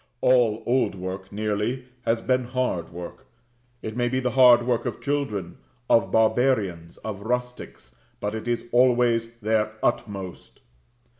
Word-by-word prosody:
All 115 -3 +3
old 125 -4 +1
work 95 +1 -6
nearly 105 +4 -2 0.2
has 115 0 +2
been 130 -1 +1
hard 125 -10 -2
work. 85 0 -9 0.6
It 110 0 -5
may 120 0 +1
be 130 +1 0
the 125 -1 -1
hard 125 -2 +6
work 120 -2 0
of - - -4
children, 110 -12 -3 0.3
of 115 - +3
barbarians, 110 -7 +1
of 105 -3 -5
rustics; 125 - -4 0.2
but 105 +1 -3
it 110 +1 -5
is 120 -1 -1
always 120 -2 +3
their 110 0 +1
utmost. 100 -6 -3
115 Hz, 140 wpm, -25 LUFS, 105-125 Hz, 0.6 s, hard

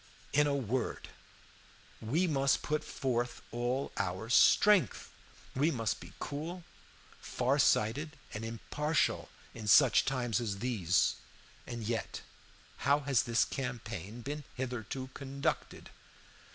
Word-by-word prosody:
"In 145 +1 +4
a 140 - +1
word, 130 -2 -2 0.9
we 150 +12 +1
must 140 -4 +2
put 150 0 -1
forth 120 -2 -2
all 120 +3 -1
our 100 +3 -2
strength. 205 +8 +5 0.4
We 145 +5 +3
must 115 -8 -1
be 90 +2 -12
cool, 165 +5 -5 0.6
far 130 +4 0
sighted, 145 +6 +2 0.2
and 105 - -5
impartial 150 +7 -1 0.2
in 110 -2 -7
such - - +6
times 120 -5 0
as 105 -4 -2
these. 100 -7 +1 0.5
And 120 -1 -5
yet, 115 0 -3 0.6
how 140 +2 +2
has 135 -4 +2
this 115 0 +2
campaign 115 -5 -5
been 145 +3 -4
hitherto 130 0 -4
conducted? 140 0 -3
125 Hz, 115 wpm, -32 LUFS, 115-140 Hz, 0.9 s, such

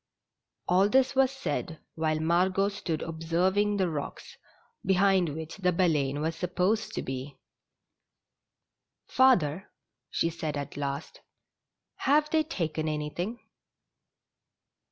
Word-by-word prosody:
All 190 +3 +4
this 265 +3 +3
was 270 -1 +4
said 220 - -4
while 155 -1 0
Margot 185 +5 +2
stood 170 -6 -3
observing 180 +6 +1
the 190 -2 +2
rocks, 150 -4 -6 0.5
behind 190 -2 +3
which 160 +2 -6
the 180 -2 +2
Baleine 150 -6 +1
was 160 +1 -1
supposed 180 +5 0
to - - -2
be. 135 +1 -6 1.7
Father," 195 - +3 0.4
she 165 - 0
said 155 -3 -4
at 140 - -5
last, 140 +1 -4 0.8
"have 300 +2 +2
they 315 - +4
taken 160 - -2
any 150 0 -3
thing 210 +10 -4
175 Hz, 115 wpm, -28 LUFS, 155-200 Hz, 1.7 s, All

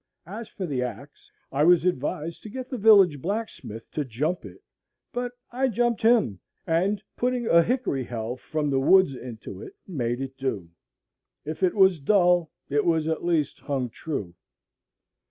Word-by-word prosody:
As 210 +6 -7
for 190 - -5
the 140 -6 -2
axe, 135 +3 -7 0.2
I 140 +2 +1
was 175 +1 +5
advised 160 -1 -2
to 215 - -9
get 255 +4 -7
the 255 - -2
village 195 -9 +6
blacksmith 195 - -4
to 150 - -1
"jump" 145 +8 -2
it; - - -12 0.5
but 245 0 -3 0.2
I 260 +2 +1
jumped 240 -1 0
him, 220 - +3 0.3
and, 190 +5 +1
putting 250 -1 0
a 170 -5 +6
hickory 225 - 0
helve 120 +1 -5
from 150 -2 -2
the 135 - +2
woods 185 +2 +5
into 125 -3 -8
it, 400 -1 -10
made 120 -9 -2
it 135 0 -5
do. 105 -11 -3 0.7
If 155 +3 -5
it 185 +1 +2
was 190 -4 +5
dull, 175 0 +3 0.2
it 145 0 +1
was 160 -2 +1
at 160 -1 -1
least 165 -4 0
hung 130 -4 -2
true. 105 - -5
165 Hz, 165 wpm, -26 LUFS, 135-205 Hz, 0.7 s, village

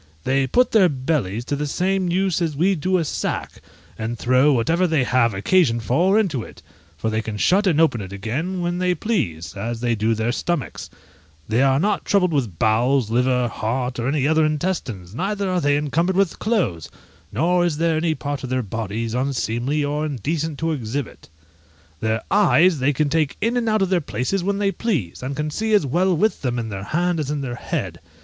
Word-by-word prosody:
They 135 +1 +1
put 250 - +3
their 195 -5 +5
bellies 130 - -2
to 145 - -2
the 150 +1 -2
same 185 +4 0
use 185 0 +1
as 160 -3 -1
we 180 +7 +2
do 185 +2 0
a 165 - 0
sack, - - -3 0.4
and 115 +2 -3
throw 130 +5 +3
whatever 165 +9 +2
they 155 -5 +2
have 120 -3 +2
occasion 120 - +2
for 165 - +2
into 165 - 0
it, - - -12 0.3
for 110 +7 -2
they 110 0 0
can 110 -1 -5
shut 195 - +3
and 160 -4 +2
open 155 -9 +3
it 95 -1 -8
again 140 - -3
when 175 +1 -1
they 180 0 +1
please, 100 - -2
as 115 +3 -4
they 120 0 0
do 110 +1 +1
their 110 +2 0
stomachs; 170 +1 -3 0.6
they 110 +3 +1
are 135 0 +3
not 205 +5 0
troubled 180 -4 +2
with 120 - -1
bowels, 115 +3 +2
liver, 125 +1 +2
heart, 125 +3 -3
or 120 - -1
any 140 0 +1
other 160 +1 +3
intestines, 150 - -2
neither 195 - -2
are 180 -1 +1
they 145 -1 +2
encumbered 165 +5 0
with 195 -2 +1
clothes, 180 - -1 0.4
nor 175 - +2
is 170 -4 0
there 165 0 +1
any 160 0 0
part 145 -2 -4
of 130 - -4
their 130 0 0
bodies 110 +2 -4
unseemly 130 +2 -1
or 150 +1 -1
indecent 155 +2 -2
to 165 +2 -1
exhibit. 130 - -5 0.7
Their 110 +2 -1
eyes 185 -5 +4
they 130 +3 +2
can 150 +1 0
take 155 -2 0
in 230 +3 0
and 235 -2 +1
out 215 -2 +2
of 190 - 0
their 180 -2 +3
places 155 +6 -2
when 200 +2 0
they 200 -1 +1
please, 160 - -2
and 135 +2 -4
can 150 +1 -2
see 220 +6 +1
as 200 - +3
well 175 +6 +1
with 215 +6 +1
them 125 -3 -1
in 115 -2 -3
their 95 -1 -6
hand 175 +3 0
as 145 -3 -2
in 150 -1 -2
their 130 -3 -4
head! 120 - -4
145 Hz, 205 wpm, -22 LUFS, 120-180 Hz, 0.7 s, their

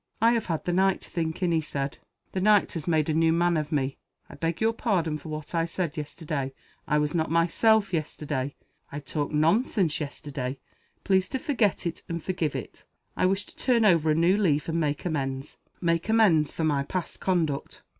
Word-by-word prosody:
"I 230 +1 +5
have 230 -2 0
had 165 -3 -2
the 175 - 0
night 190 +1 +3
to - - -11
think 165 +1 -2
in," 175 - +2
he 165 -1 +2
said. 140 -2 -4 0.3
"The 185 - -2
night 210 0 +4
has 165 -2 -5
made 155 -3 +2
a 155 - +1
new 160 +1 +3
man 170 +1 +2
of 155 0 -2
me. 135 -3 0 0.3
I - - -13
beg 165 0 -2
your 225 +1 +2
pardon 170 -10 0
for 155 - -10
what 155 +1 -6
I 165 0 +1
said 170 -2 -3
yesterday. 150 -3 -4 0.3
I 150 - +2
was 150 0 0
not 160 -3 0
myself 190 +5 +3
yesterday. 145 -4 -2 0.4
I 145 - -4
talked 145 +1 -3
nonsense 165 - +2
yesterday. 140 -3 -4 0.5
Please 190 -1 +2
to - - -1
forget 250 -9 0
it, 170 - -3
and 170 -1 -3
forgive 170 -6 -1
it. - - -7 0.3
I - - +2
wish 195 +2 0
to - - -18
turn 240 -4 +2
over 165 -5 +4
a 155 - +4
new 170 +5 +4
leaf 155 -8 +1
and 165 0 0
make 150 -1 -1
amends 135 -4 -3 0.2
make 170 +2 0
amends 195 -10 +4
for 165 - -3
my 145 -3 +2
past 175 +5 -4
conduct. 165 -7 -1
165 Hz, 205 wpm, -27 LUFS, 150-185 Hz, 0.5 s, I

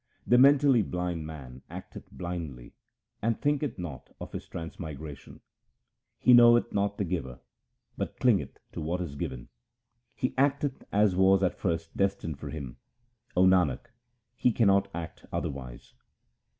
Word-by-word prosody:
The 125 - +5
mentally 140 -2 +6
blind 90 -5 -3
man 65 -5 -9
acteth - - -9
blindly, 85 -9 -6 0.5
and 115 +1 0
thinketh 145 -4 0
not 80 -8 -7
of - - -8
his - - -7
transmigration. 80 -4 -8 0.8
He 125 - +5
knoweth 120 -1 +6
not 100 0 0
the - - 0
Giver, 80 -9 -4 0.6
but - - -4
clingeth - - +2
to - - -6
what 85 +4 -2
is 85 -6 -4
given: 65 -3 -5 0.7
He 130 - -1
acteth 140 0 +1
as 100 -2 +3
was 95 +1 +4
at 90 - 0
first 80 -2 -2
destined 95 -6 -1
for - - -6
him; 70 -6 -7 0.6
O 90 - +6
Nanak, 90 - +2 0.4
he 125 - +2
cannot 100 -4 +3
act 85 -2 -7
otherwise. 65 -3 -5
90 Hz, 135 wpm, -29 LUFS, 75-110 Hz, 0.8 s, mentally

